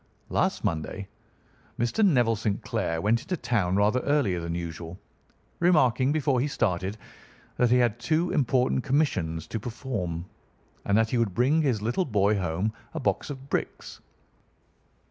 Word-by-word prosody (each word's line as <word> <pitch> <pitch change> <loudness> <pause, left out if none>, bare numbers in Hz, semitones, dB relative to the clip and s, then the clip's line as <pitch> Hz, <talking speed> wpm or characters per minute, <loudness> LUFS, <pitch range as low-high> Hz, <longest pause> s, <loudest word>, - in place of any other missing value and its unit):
"Last - - 0
Monday 85 +5 -3 0.7
Mr. 120 - +1
Neville 120 - +4
St. 105 -1 -2
Clair 80 0 -1
went 115 +5 +2
into 180 - -3
town 100 - 0
rather 105 +5 +3
earlier 130 -10 +1
than 85 0 -4
usual, 85 0 -6 0.6
remarking 140 -7 +3
before 145 -4 +1
he 135 - +1
started 95 -6 -1 0.6
that 125 - +3
he 125 - +5
had 120 -2 +2
two 160 +7 +1
important 130 -2 +1
commissions 90 - 0
to 110 - -4
perform, 105 -7 -4 0.6
and 100 - +3
that 115 0 +2
he 125 - +1
would 105 -6 0
bring 140 +7 +3
his 125 -8 0
little 120 - 0
boy 105 -4 +2
home 90 +5 -1 0.2
a - - -1
box 135 - -1
of 135 -1 -7
bricks. - - -4
115 Hz, 150 wpm, -27 LUFS, 95-135 Hz, 0.7 s, he